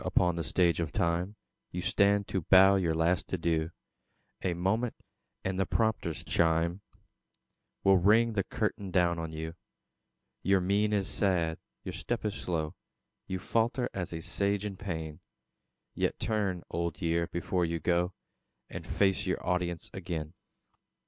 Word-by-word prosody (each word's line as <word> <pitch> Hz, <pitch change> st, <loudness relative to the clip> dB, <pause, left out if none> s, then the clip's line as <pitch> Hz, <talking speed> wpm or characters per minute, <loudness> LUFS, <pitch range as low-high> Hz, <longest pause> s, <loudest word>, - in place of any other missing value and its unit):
upon 90 Hz, -1 st, +2 dB
the 85 Hz, -, -2 dB
Stage 85 Hz, -1 st, +2 dB
of 80 Hz, -2 st, -1 dB
Time 85 Hz, +4 st, 0 dB, 0.3 s
You 90 Hz, 0 st, -4 dB
stand 100 Hz, +2 st, +3 dB
to 95 Hz, -, 0 dB
bow 95 Hz, +4 st, +7 dB
your 85 Hz, -4 st, +1 dB
last 85 Hz, +2 st, +1 dB
adieu; 80 Hz, -2 st, 0 dB, 0.7 s
A 90 Hz, -2 st, 0 dB
moment, 110 Hz, +7 st, 0 dB, 0.5 s
and 95 Hz, 0 st, -1 dB
the 95 Hz, -, +3 dB
prompter's 110 Hz, -7 st, 0 dB
chime 85 Hz, +3 st, +2 dB, 1.0 s
Will 95 Hz, -1 st, +6 dB
ring 110 Hz, +5 st, +4 dB
the 100 Hz, -2 st, +1 dB
curtain 100 Hz, +1 st, -2 dB
down 85 Hz, -1 st, +2 dB
on 80 Hz, -1 st, -4 dB
you. 80 Hz, +1 st, -5 dB, 0.9 s
Your 95 Hz, 0 st, +3 dB
mien 100 Hz, +3 st, +2 dB
is 100 Hz, -3 st, +1 dB
sad, 85 Hz, -7 st, +1 dB, 0.2 s
your -, -, -5 dB
step -, -, -3 dB
is 105 Hz, -, 0 dB
slow; 80 Hz, -6 st, -2 dB, 0.5 s
You 95 Hz, -, -2 dB
falter 115 Hz, +6 st, 0 dB
as 90 Hz, -3 st, -3 dB
a 80 Hz, -1 st, -4 dB
Sage 100 Hz, +3 st, 0 dB
in 100 Hz, -2 st, -4 dB
pain; 80 Hz, -5 st, -5 dB, 0.7 s
Yet -, -, 0 dB
turn, 100 Hz, -6 st, -1 dB
Old 85 Hz, -2 st, -2 dB
Year, 85 Hz, 0 st, +1 dB
before 90 Hz, +1 st, -1 dB
you 85 Hz, 0 st, -1 dB
go, 90 Hz, +3 st, +1 dB, 0.6 s
And -, -, -7 dB
face 95 Hz, -1 st, +2 dB
your 95 Hz, -, -1 dB
audience 90 Hz, -2 st, -1 dB
again. 85 Hz, -4 st, -4 dB
90 Hz, 150 wpm, -30 LUFS, 85-100 Hz, 1.0 s, bow